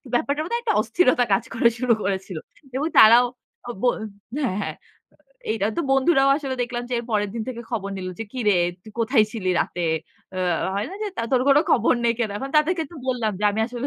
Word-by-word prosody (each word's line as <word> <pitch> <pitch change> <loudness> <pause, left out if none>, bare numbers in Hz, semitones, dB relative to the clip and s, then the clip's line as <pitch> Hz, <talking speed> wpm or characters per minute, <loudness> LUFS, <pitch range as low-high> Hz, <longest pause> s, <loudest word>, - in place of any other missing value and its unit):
ব্যাপারটা 290 -1 0
বোধহয় 470 +8 -2
একটা 450 - +1
অস্থিরতা 255 -7 +2
কাজ 195 - +2
করা 235 0 +4
শুরু 250 -2 +3
করেছিল। 190 -2 -3 0.4
এবং 290 +4 0
তারাও 235 +3 +8 0.4
ও - - -1
বো 250 - +2 0.6
হ্যাঁ, 200 -6 -1
হ্যাঁ। - - -5 0.8
এইটা 220 -3 -1
তো - - +1
বন্ধুরাও 270 0 +4
আসলে 275 -3 -4
দেখলাম 240 0 -4
যে - - 0
এর 235 - -5
পরের 205 -2 0
দিন 225 - -3
থেকে 235 -2 -5
খবর 200 -4 -3
নিলো 185 -1 -5
যে 225 - -4
"কিরে 215 -6 +1 0.3
তুই 215 - -13
কোথায় 230 -1 +3
ছিলি 190 -5 -2
রাতে?" 175 -1 -2 0.5
এ্যাঁ 180 -2 0 0.2
হয় 200 +2 -1
না? - - -7
যে, 425 - -1
তা - - -2
"তোর 250 - +4
কোন 275 - +6
খবর - - +4
নেই 235 - +3
কেন?" 225 -3 -1
এখন 270 +6 -5
তাদেরকে 325 +2 +2
তো - - -13
বললাম 240 -4 0
যে - - -1
আমি 210 +2 -2
আসলে 245 +2 -4
235 Hz, 210 wpm, -23 LUFS, 210-270 Hz, 0.8 s, তারাও